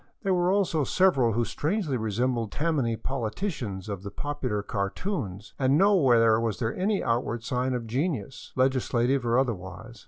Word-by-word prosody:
There 195 -2 +2
were 175 0 +2
also 190 -6 +1
several 135 -8 +3
who 120 +2 +1
strangely 160 - -1
resembled 115 0 -1
Tammany 145 -7 0
politicians 120 - -4
of 100 -3 -4
the 100 - -6
popular 130 -5 -3
cartoons, 105 - -3
and 135 +1 +3
nowhere 130 - +5
was 115 -3 -1
there 115 -1 -2
any 200 +2 0
outward 115 -1 -1
sign 125 +1 -1
of 120 -2 -3
genius, 130 - -3
legislative 130 0 +1
or 115 +1 +3
other 130 -2 +2
wise. 100 +5 -10
125 Hz, 155 wpm, -27 LUFS, 110-145 Hz, -, nowhere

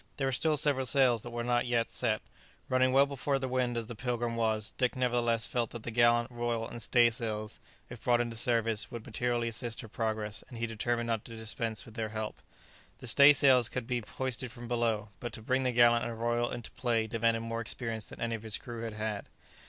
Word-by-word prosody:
There 135 - 0
were 135 - +1
still 155 +4 +1
several 135 -2 +1
sails 125 -4 +4
that 120 - -7
were 120 0 -3
not 120 0 +1
yet 120 -1 +1
set. 110 -3 0 0.5
Running 130 0 +3
well 135 +2 +6
before 140 0 -1
the 130 -1 -3
wind 125 -2 0
as 115 - -2
the 120 - -7
"Pilgrim" 120 0 -2
was, 110 -2 0
Dick 125 -1 +2
nevertheless 120 -2 +1
felt 120 -2 -1
that 120 -2 -8
the 120 - -4
gallant, 120 +1 +3
royal, 120 -1 -2
and 120 - -7
stay 120 +1 +4
sails, 110 -2 -3 0.3
if 120 -2 -11
brought 120 -1 +3
into 120 -1 -2
service, 115 -1 +1
would 120 -3 -7
materially 120 +1 -1
assist 115 0 -2
her - - -9
progress, 110 -1 -3
and 120 - -9
he 115 - -1
determined 115 +1 -1
not 115 -2 -1
to 115 - -9
dispense 110 0 -2
with 110 - -13
their 110 -1 -3
help. 110 0 -5 0.6
The - - -11
stay 140 +4 +8
sails 130 -5 +5
could 125 -2 -4
be 120 0 -1
hoisted 125 +2 -3
from 120 0 -9
below, 115 -3 0
but 120 - -5
to - - -6
bring 130 +3 +1
the 130 -1 +1
gallant 120 0 +5
and 115 -1 -4
royal 120 +1 +1
into 120 -2 -6
play 115 -3 0
demanded 115 +1 +1
more 115 0 -3
experience 115 -2 -4
than - - -11
any 115 0 -1
of 115 - -4
his 110 -2 +1
crew 120 -2 -7
had 115 -1 -4
had. 105 -1 -4
120 Hz, 225 wpm, -31 LUFS, 115-125 Hz, 0.6 s, stay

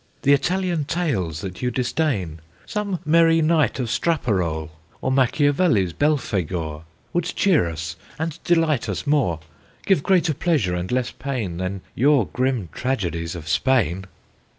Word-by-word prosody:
The 140 - +5
Italian 175 +1 0
Tales 110 - -1
that 95 -2 -7
you 125 - +1
disdain, 120 - -1 0.3
Some 205 -4 -2
merry 165 +1 +5
Night 155 -5 +2
of 125 - 0
Straparole, 95 - 0 0.3
Or 130 - -1
Machiavelli's 135 - +2
Belphagor, 90 - -1 0.3
Would 175 -1 +1
cheer 180 - +2
us 80 0 -5 0.2
and 160 0 -4
delight 165 -7 +2
us - - -3
more, 135 - +1 0.4
Give 190 -7 +3
greater 175 -2 +2
pleasure 140 - +1
and 90 +3 -3
less 125 -1 0
pain 120 -10 -4
Than 95 +1 -3
your 135 -2 +3
grim 120 - -1
tragedies 85 -10 -2
of 80 -2 -8
Spain!" 95 0 +1
130 Hz, 135 wpm, -22 LUFS, -, 0.4 s, The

